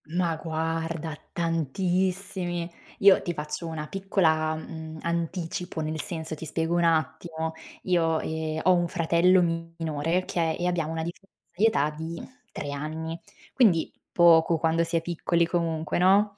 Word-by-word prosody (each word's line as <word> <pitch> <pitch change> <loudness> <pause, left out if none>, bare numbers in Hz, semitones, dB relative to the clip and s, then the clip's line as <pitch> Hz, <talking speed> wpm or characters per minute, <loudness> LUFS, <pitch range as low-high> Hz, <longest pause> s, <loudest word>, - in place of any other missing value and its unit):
Ma 170 +1 0
guarda, 160 0 -3 0.2
tantissimi. 175 +2 -1 0.3
Io 200 -1 +7
ti 175 - -3
faccio 150 +3 -4
una 155 -2 -5
piccola, 160 -5 +1
mhmm, 160 0 -8
anticipo. 170 +1 -3
Nel 155 0 -2
senso, 160 -2 -3
ti 155 +1 -6
spiego 165 +2 -1
un 175 - +2
attimo: 160 0 0 0.3
io, 165 -3 +2
ehm, 160 0 -3
ho 185 - +6
un 175 -1 +2
fratello 175 +2 +3 0.4
minore, 160 +1 -1
okay, 170 -3 0
e 175 - -2
abbiamo 165 -3 -1
una 160 0 -2
differenza 175 +4 -8 0.3
di 205 +5 +3
età 150 -9 +2
di 160 +2 -6 0.2
3 145 - -5
anni, 160 +3 -4 0.3
quindi 195 -11 +3 0.2
poco 165 -1 +5
quando 165 +1 +2
si 165 +1 -2
è 165 - +3
piccoli, 170 0 +1
comunque, 165 -2 -1
no? 200 +3 +4
165 Hz, 145 wpm, -27 LUFS, 160-175 Hz, 0.4 s, Io